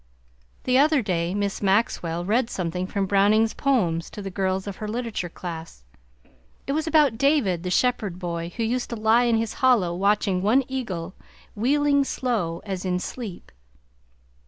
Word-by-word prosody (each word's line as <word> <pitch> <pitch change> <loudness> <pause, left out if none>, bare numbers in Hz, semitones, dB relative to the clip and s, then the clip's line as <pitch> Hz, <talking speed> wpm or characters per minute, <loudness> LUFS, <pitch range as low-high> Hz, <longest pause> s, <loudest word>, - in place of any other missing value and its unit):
The 255 +1 +3
other 295 -2 +4
day 175 -2 -1
Miss 200 -1 -2
Maxwell 190 -4 0
read 230 +4 +1
something 180 -1 -3
from 195 0 -1
Browning's 205 +3 +3
poems 180 - 0
to 205 - -8
the 195 - -5
girls 190 0 -1
of 200 -2 -6
her 215 - -5
literature 225 -5 -3
class. 165 - -8 0.8
It - - -2
was 310 +3 -1
about 295 -8 +3
David 275 - +2
the 180 - -4
shepherd 210 -3 0
boy 170 -2 -4
who 230 - 0
used 240 +2 -1
to 235 - -3
lie 225 +2 +3
in 235 -1 +3
his 225 -1 -2
hollow 235 -10 +4
watching 195 -1 +1
one 230 +8 +3
eagle 190 -10 -4 0.4
"wheeling 280 +5 +2
slow 215 -12 -2
as 190 -3 -4
in 180 -1 0
sleep." 210 -2 -7
205 Hz, 160 wpm, -24 LUFS, 180-245 Hz, 0.8 s, other